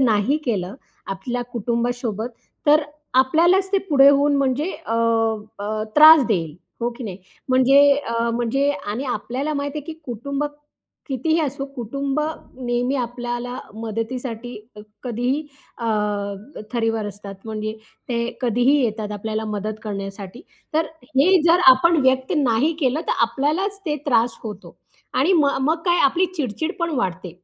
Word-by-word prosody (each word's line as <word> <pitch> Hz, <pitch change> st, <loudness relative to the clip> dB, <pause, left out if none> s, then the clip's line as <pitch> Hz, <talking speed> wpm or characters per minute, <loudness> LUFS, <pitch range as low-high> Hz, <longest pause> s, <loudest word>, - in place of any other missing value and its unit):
नाही 235 Hz, +3 st, +3 dB
केलं 195 Hz, -6 st, -2 dB, 0.3 s
आपल्या 240 Hz, +6 st, -3 dB
कुटुंबासोबत 235 Hz, -1 st, -2 dB, 0.4 s
तर 300 Hz, +1 st, +6 dB, 0.3 s
आपल्यालाच 340 Hz, +9 st, +4 dB
ते 395 Hz, -, +4 dB
पुढे 280 Hz, -3 st, +7 dB
होऊन, 285 Hz, 0 st, +4 dB
म्हणजे 275 Hz, +6 st, 0 dB, 0.2 s
अ, 225 Hz, -, -1 dB, 0.6 s
अ, 215 Hz, +1 st, -3 dB
त्रास 310 Hz, -2 st, +9 dB
देईल, 165 Hz, -8 st, -1 dB, 0.3 s
हो 240 Hz, +1 st, 0 dB
की 250 Hz, -, -7 dB
नाही? 190 Hz, -2 st, -6 dB, 0.3 s
म्हणजे 270 Hz, +3 st, +6 dB, 0.2 s
अ, 230 Hz, 0 st, 0 dB
म्हणजे 240 Hz, +5 st, +1 dB
आणि 265 Hz, -3 st, -4 dB
आपल्याला 255 Hz, +5 st, -3 dB
माहिती 285 Hz, +1 st, -3 dB
आहे 290 Hz, -, -8 dB
की 320 Hz, -, -15 dB
कुटुंब 275 Hz, +5 st, -3 dB, 0.6 s
कितीही 295 Hz, +5 st, 0 dB
असो, 275 Hz, -2 st, -2 dB
कुटुंब 275 Hz, +4 st, -3 dB, 0.4 s
नेहमी 245 Hz, +1 st, -1 dB
आपल्याला 245 Hz, 0 st, -4 dB, 0.2 s
मदतीसाठी 230 Hz, +2 st, -5 dB, 0.5 s
कधीही 250 Hz, +5 st, -1 dB, 0.3 s
अ, 235 Hz, -, -5 dB, 0.9 s
थरीवर 225 Hz, -2 st, 0 dB
असतात 200 Hz, -1 st, -8 dB
म्हणजे 215 Hz, -1 st, -4 dB, 0.4 s
ते 240 Hz, -, -1 dB, 0.2 s
कधीही 245 Hz, +2 st, +2 dB
येतात 215 Hz, -2 st, -2 dB
आपल्याला 220 Hz, +1 st, -3 dB
मदत 210 Hz, 0 st, -3 dB
करण्यासाठी. 195 Hz, +1 st, -6 dB, 0.3 s
तर 320 Hz, +1 st, +2 dB, 0.3 s
हे 360 Hz, +6 st, +5 dB
जर 345 Hz, +2 st, +5 dB
आपण 335 Hz, +6 st, +3 dB
व्यक्त 260 Hz, 0 st, +2 dB
नाही 275 Hz, +3 st, +2 dB
केलं 270 Hz, +2 st, +1 dB
तर -, -, +3 dB
आपल्यालाच 310 Hz, -, -1 dB
ते 300 Hz, -1 st, 0 dB
त्रास 235 Hz, -2 st, +2 dB
होतो 210 Hz, -3 st, -8 dB, 0.4 s
आणि 305 Hz, +9 st, +3 dB
मग 285 Hz, -6 st, +3 dB
मग 310 Hz, +4 st, +3 dB
काय, 350 Hz, -1 st, +3 dB
आपली 340 Hz, +7 st, +3 dB
चिड-चिड 305 Hz, -, -2 dB
पण 335 Hz, -1 st, -1 dB
वाढते, 185 Hz, -5 st, -2 dB
250 Hz, 140 wpm, -22 LUFS, 225-285 Hz, 0.9 s, त्रास